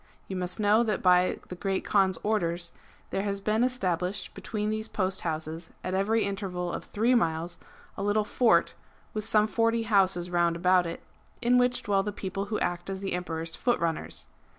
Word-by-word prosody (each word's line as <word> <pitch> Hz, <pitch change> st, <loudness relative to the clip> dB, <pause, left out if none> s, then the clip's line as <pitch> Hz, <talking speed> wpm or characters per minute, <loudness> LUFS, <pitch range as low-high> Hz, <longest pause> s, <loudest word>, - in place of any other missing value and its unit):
You 190 Hz, -, -5 dB
must 180 Hz, +1 st, -2 dB
know 210 Hz, +2 st, +4 dB
that 215 Hz, -4 st, -1 dB
by 180 Hz, 0 st, +4 dB
the 180 Hz, -, -5 dB
Great 195 Hz, +1 st, -2 dB
Kaan's 190 Hz, -2 st, +3 dB
orders 175 Hz, -5 st, 0 dB, 0.4 s
there 195 Hz, -, 0 dB
has 200 Hz, 0 st, -2 dB
been 215 Hz, +3 st, +1 dB
established 190 Hz, -6 st, -1 dB
between 210 Hz, -1 st, -3 dB
those 220 Hz, 0 st, -2 dB
post 190 Hz, -3 st, -1 dB
houses, 160 Hz, 0 st, -4 dB
at 185 Hz, -, -3 dB
every 215 Hz, +4 st, +2 dB
interval 185 Hz, -3 st, -3 dB
of -, -, -5 dB
three 230 Hz, +4 st, +1 dB
miles, 165 Hz, -6 st, 0 dB, 0.4 s
a -, -, -5 dB
little 205 Hz, +1 st, +2 dB
fort 210 Hz, -5 st, +3 dB, 0.4 s
with 215 Hz, -1 st, -3 dB
some 215 Hz, -1 st, +4 dB
forty 230 Hz, +1 st, +1 dB
houses 190 Hz, -5 st, +2 dB
round 170 Hz, -1 st, +2 dB
about 180 Hz, 0 st, +3 dB
it, 165 Hz, -, -6 dB, 0.4 s
in 245 Hz, 0 st, +4 dB
which 245 Hz, 0 st, +1 dB
dwell 200 Hz, -1 st, +2 dB
the 210 Hz, +1 st, -3 dB
people 195 Hz, 0 st, -4 dB
who 210 Hz, +1 st, -2 dB
act 175 Hz, +1 st, -2 dB
as 190 Hz, 0 st, -4 dB
the 195 Hz, -, -2 dB
Emperor's 165 Hz, -2 st, -3 dB
foot 240 Hz, -1 st, +1 dB
runners. 165 Hz, -1 st, -3 dB
195 Hz, 185 wpm, -28 LUFS, 175-215 Hz, 0.4 s, know